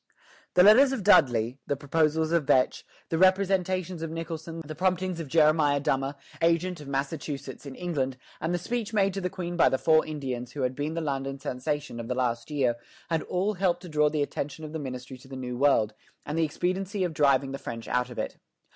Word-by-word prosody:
The 180 Hz, -, +7 dB
letters 250 Hz, +7 st, +7 dB
of 220 Hz, -, -3 dB
Dudley, 125 Hz, -, +4 dB
the 140 Hz, -, +1 dB
proposals 155 Hz, +3 st, +1 dB
of 170 Hz, -4 st, +2 dB
Vetch, 130 Hz, -, +3 dB, 0.3 s
the 165 Hz, -, 0 dB
representations 185 Hz, -2 st, +2 dB
of 165 Hz, -, -3 dB
Nicholson, 165 Hz, 0 st, -6 dB
the 155 Hz, -, -6 dB
promptings 185 Hz, +1 st, 0 dB
of 165 Hz, -, -5 dB
Jeremiah 150 Hz, -1 st, +4 dB
Dummer, 135 Hz, 0 st, 0 dB, 0.3 s
agent 170 Hz, 0 st, +1 dB
of 145 Hz, -, -10 dB
Massachusetts 140 Hz, 0 st, -4 dB
in 135 Hz, -, -8 dB
England, 135 Hz, -7 st, -2 dB, 0.2 s
and 160 Hz, -, -2 dB
the 175 Hz, -, +1 dB
speech 230 Hz, +4 st, -3 dB
made 195 Hz, -2 st, +2 dB
to 195 Hz, -, -3 dB
the 180 Hz, -, -1 dB
Queen 175 Hz, -2 st, -5 dB
by 170 Hz, -, +5 dB
the 130 Hz, -, +1 dB
four 155 Hz, +3 st, +4 dB
Indians 130 Hz, -5 st, -5 dB
who 140 Hz, -, -3 dB
had 125 Hz, 0 st, 0 dB
been 145 Hz, +4 st, -3 dB
the 165 Hz, -, -1 dB
London 135 Hz, -2 st, -2 dB
sensation 140 Hz, 0 st, -3 dB
of 115 Hz, -, -5 dB
the 125 Hz, -, -2 dB
last 120 Hz, -1 st, -1 dB
year, 130 Hz, -6 st, +1 dB, 0.3 s
had 165 Hz, -1 st, +2 dB
all 190 Hz, +4 st, -1 dB
helped 185 Hz, -2 st, 0 dB
to 180 Hz, -, -8 dB
draw 150 Hz, -1 st, +3 dB
the 150 Hz, -1 st, 0 dB
attention 145 Hz, +2 st, -5 dB
of 155 Hz, -, -8 dB
the 160 Hz, -, -3 dB
ministry 130 Hz, -1 st, -7 dB
to 130 Hz, -, -16 dB
the 135 Hz, -, -8 dB
New 125 Hz, -1 st, -4 dB
World, 120 Hz, -5 st, +3 dB, 0.3 s
and 150 Hz, -, -3 dB
the 165 Hz, 0 st, +2 dB
expediency 185 Hz, +5 st, -2 dB
of 175 Hz, -3 st, -1 dB
driving 140 Hz, -3 st, +3 dB
the 135 Hz, -, -5 dB
French 115 Hz, -4 st, -7 dB
out 125 Hz, 0 st, 0 dB
of 125 Hz, -, -10 dB
it. -, -, -3 dB
155 Hz, 215 wpm, -27 LUFS, 135-175 Hz, 0.3 s, The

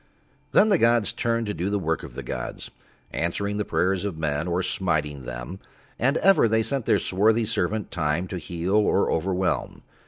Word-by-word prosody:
Then 220 Hz, -, +5 dB
the 195 Hz, -5 st, +4 dB
gods 115 Hz, -2 st, +3 dB
turned 115 Hz, -1 st, 0 dB
to 105 Hz, -, -2 dB
do 90 Hz, +4 st, -2 dB
the 105 Hz, -, 0 dB
work 80 Hz, -4 st, -1 dB
of -, -, -10 dB
the -, -, -5 dB
gods, -, -, -5 dB, 0.4 s
answering 100 Hz, +5 st, -2 dB
the 105 Hz, -, 0 dB
prayers 95 Hz, -1 st, 0 dB
of 100 Hz, -6 st, -3 dB
men 75 Hz, +1 st, -1 dB
or 90 Hz, +1 st, 0 dB
smiting 75 Hz, -8 st, -1 dB
them, -, -, -6 dB, 0.4 s
and 135 Hz, +5 st, +2 dB
ever 195 Hz, -11 st, +5 dB
They 110 Hz, 0 st, +2 dB
sent 135 Hz, -1 st, -2 dB
Their -, -, +4 dB
swarthy 110 Hz, +5 st, +2 dB
servant 105 Hz, -1 st, -1 dB
Time 75 Hz, +2 st, -1 dB
to 90 Hz, -, -4 dB
heal 85 Hz, +3 st, -3 dB
or 105 Hz, -, +2 dB
overwhelm. 95 Hz, +2 st, -1 dB
95 Hz, 185 wpm, -25 LUFS, 85-110 Hz, 0.4 s, Then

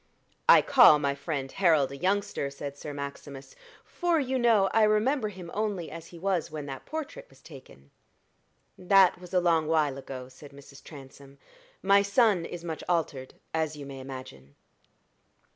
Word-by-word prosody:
"I -, -, +8 dB
call 150 Hz, -, +7 dB
my 140 Hz, -1 st, -1 dB
friend 140 Hz, -2 st, -5 dB
Harold 160 Hz, -8 st, +2 dB
a -, -, -7 dB
youngster," 190 Hz, -2 st, -1 dB
said 140 Hz, 0 st, -8 dB
Sir 145 Hz, +1 st, -8 dB
Maximus, 140 Hz, -1 st, -8 dB, 0.3 s
"for, 345 Hz, -2 st, 0 dB
you 265 Hz, -2 st, -1 dB
know, 225 Hz, -5 st, +4 dB
I 225 Hz, -, +3 dB
remember 215 Hz, +3 st, +2 dB
him 180 Hz, -4 st, -10 dB
only 205 Hz, -5 st, -3 dB
as 165 Hz, 0 st, -9 dB
he 175 Hz, -, -13 dB
was 185 Hz, -1 st, -1 dB
when 150 Hz, -2 st, -7 dB
that 135 Hz, -2 st, -9 dB
portrait 405 Hz, -, -7 dB
was -, -, -21 dB
taken." 70 Hz, -, -15 dB, 0.9 s
"That 185 Hz, -1 st, +4 dB
is 180 Hz, -, -12 dB
a 185 Hz, -, +3 dB
long 165 Hz, -3 st, +1 dB
while 150 Hz, -4 st, +1 dB
ago," 130 Hz, -2 st, -8 dB
said 140 Hz, +2 st, -15 dB
Mrs. 140 Hz, 0 st, -15 dB
Transome. 140 Hz, -1 st, -14 dB, 0.5 s
"My 200 Hz, +1 st, +5 dB
son 200 Hz, -3 st, +2 dB
is 175 Hz, 0 st, -8 dB
much 165 Hz, -2 st, -6 dB
altered, 150 Hz, -7 st, -2 dB, 0.2 s
as 160 Hz, -1 st, -1 dB
you 145 Hz, -1 st, -9 dB
may 135 Hz, -1 st, -9 dB
imagine." 130 Hz, -, -10 dB
160 Hz, 165 wpm, -27 LUFS, 140-195 Hz, 0.9 s, I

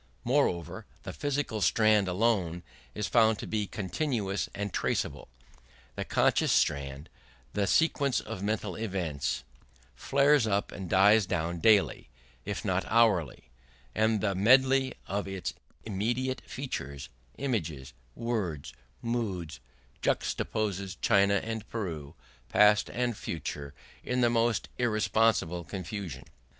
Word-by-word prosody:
Moreover, 90 Hz, +5 st, 0 dB, 0.2 s
the 95 Hz, -, -6 dB
physical 145 Hz, -5 st, -2 dB
strand 105 Hz, +3 st, +4 dB
alone 90 Hz, -3 st, +1 dB, 0.3 s
is 105 Hz, -, -2 dB
found 110 Hz, -1 st, +4 dB
to -, -, -6 dB
be 105 Hz, -2 st, -2 dB
continuous 105 Hz, -, -2 dB
and 100 Hz, -1 st, -4 dB
traceable; -, -, -1 dB, 0.7 s
the -, -, -3 dB
conscious -, -, +2 dB
strand, 70 Hz, +1 st, 0 dB, 0.5 s
the 100 Hz, -1 st, 0 dB
sequence 140 Hz, -5 st, +2 dB
of 105 Hz, -3 st, -7 dB
mental 105 Hz, -2 st, -2 dB
events, 80 Hz, -, -2 dB, 0.5 s
flares 140 Hz, -, +3 dB
up 100 Hz, -1 st, 0 dB
and 95 Hz, -3 st, -7 dB
dies 100 Hz, +2 st, +5 dB
down 85 Hz, 0 st, -2 dB
daily, 105 Hz, +1 st, +3 dB, 0.4 s
if -, -, -4 dB
not -, -, +1 dB
hourly; 95 Hz, -, +2 dB, 0.4 s
and 110 Hz, -1 st, +2 dB
the 100 Hz, -2 st, +1 dB
medley 130 Hz, +6 st, +4 dB
of 100 Hz, 0 st, -3 dB
its 95 Hz, -2 st, -4 dB, 0.3 s
immediate 120 Hz, +6 st, -1 dB
features 70 Hz, -, -5 dB, 0.3 s
images, 80 Hz, -, -3 dB, 0.2 s
words, 95 Hz, -, -3 dB, 0.3 s
moods 95 Hz, -, -3 dB, 0.4 s
juxtaposes 100 Hz, -3 st, -1 dB
China 100 Hz, 0 st, +4 dB
and 110 Hz, -1 st, -5 dB
Peru, 80 Hz, -9 st, -5 dB, 0.3 s
past 105 Hz, 0 st, +5 dB
and 120 Hz, -1 st, -1 dB
future, 70 Hz, -5 st, -5 dB, 0.3 s
in 125 Hz, 0 st, 0 dB
the 120 Hz, -1 st, +4 dB
most 115 Hz, 0 st, +1 dB
irresponsible 110 Hz, -6 st, +2 dB
confusion. 90 Hz, -, -6 dB
105 Hz, 115 wpm, -29 LUFS, 90-115 Hz, 0.7 s, dies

